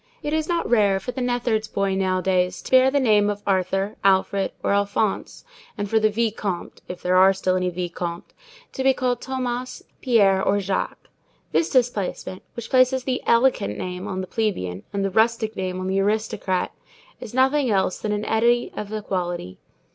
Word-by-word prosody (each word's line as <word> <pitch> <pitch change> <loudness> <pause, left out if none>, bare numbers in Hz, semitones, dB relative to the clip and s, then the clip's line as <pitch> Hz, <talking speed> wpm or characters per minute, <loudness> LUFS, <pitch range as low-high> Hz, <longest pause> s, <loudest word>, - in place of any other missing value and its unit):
It 295 - -2
is 315 +1 -1
not 340 -1 0
rare 205 -5 +3
for 220 - -5
the 260 - -5
neatherd's 240 -3 0
boy 200 -2 -1
nowadays 185 -1 0
to - - -9
bear 260 0 +6
the 285 +1 +1
name 210 -5 +3
of 205 0 -4
Arthur, 195 +1 0
Alfred, 195 0 +2
or - - +1
Alphonse, 200 - -1 0.3
and 205 0 -2
for 220 +2 +2
the 215 0 +3
vicomte—if 205 -5 -3
there 180 +1 +2
are 190 +1 +6
still 185 -1 0
any 180 0 0
vicomtes—to 180 - -6
be 265 0 +4
called 250 -1 -1
Thomas, 255 -1 -4 0.2
Pierre, 200 -6 +4
or 200 +1 +2
Jacques. 195 -1 -3 0.4
This 330 - +1
displacement, 225 -7 -1
which 235 -1 -7
places 255 0 +4
the 255 0 -2
"elegant" 235 - +2
name 180 +2 -5
on 190 -2 -3
the - - -4
plebeian 95 - -2
and 200 -1 -1
the 195 - -1
rustic 220 +1 +1
name 185 -1 -3
on 185 - -4
the 190 +1 0
aristocrat, 200 -2 -1 0.5
is 225 - -9
nothing 265 +1 +3
else 190 -3 +1
than 215 - -3
an 210 0 -2
eddy 240 +2 +2
of 210 0 -6
equality. 180 - -4
205 Hz, 175 wpm, -23 LUFS, 190-245 Hz, 0.5 s, bear